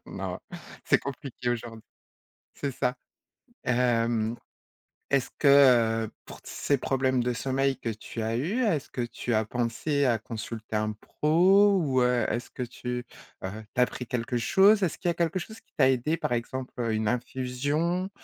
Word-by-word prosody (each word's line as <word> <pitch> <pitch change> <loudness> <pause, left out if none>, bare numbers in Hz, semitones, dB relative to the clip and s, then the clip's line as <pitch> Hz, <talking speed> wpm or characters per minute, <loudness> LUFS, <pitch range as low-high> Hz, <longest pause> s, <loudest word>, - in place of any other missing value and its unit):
Non, - - -5 0.5
c'est - - +4
compliqué 135 -2 -5
aujourd'hui. 115 -2 -4 0.7
C'est 140 - -3
ça. 125 0 -1 0.7
Hem, 115 -2 +1 0.7
est-ce 135 -2 +1
que, 145 - +3 0.6
heu, - - -14
pour - - -11
t - - -12
c - - -8 0.2
ces - - -3
problèmes 130 -1 +1
de 125 - 0
sommeil 135 +2 0
que 115 - -3
tu 110 +1 -6
as 115 +1 -1
eu, 190 - -1
est-ce 170 - 0
que 125 - -4
tu 120 0 -3
as 110 -1 +2
pensé 125 +5 0
à 120 -3 +2
consulter 110 0 -6
un 110 0 0
pro 185 - +4
ou, 130 -5 +1
heu, 125 -2 +2
est-ce 120 +2 -3
que - - -7
tu, 125 0 -5 0.4
heu, 105 +4 -5
tu 125 - +3
as - - +7
pris 125 - -6
quelque 120 0 -2
chose? 200 - +5
Est-ce 175 - 0
qu'il 175 - 0
y - - +4
a - - -5
quelque 170 +1 0
chose 220 +5 -9
qui - - -41
t'a 130 -2 +5
aidé, 135 +5 +1
par 125 - -1
exemple, 125 +2 -3
heu, 115 -2 0
une 110 0 0
infusion, 130 +8 -1
heu, 195 - -7
125 Hz, 185 wpm, -27 LUFS, 115-145 Hz, 0.7 s, as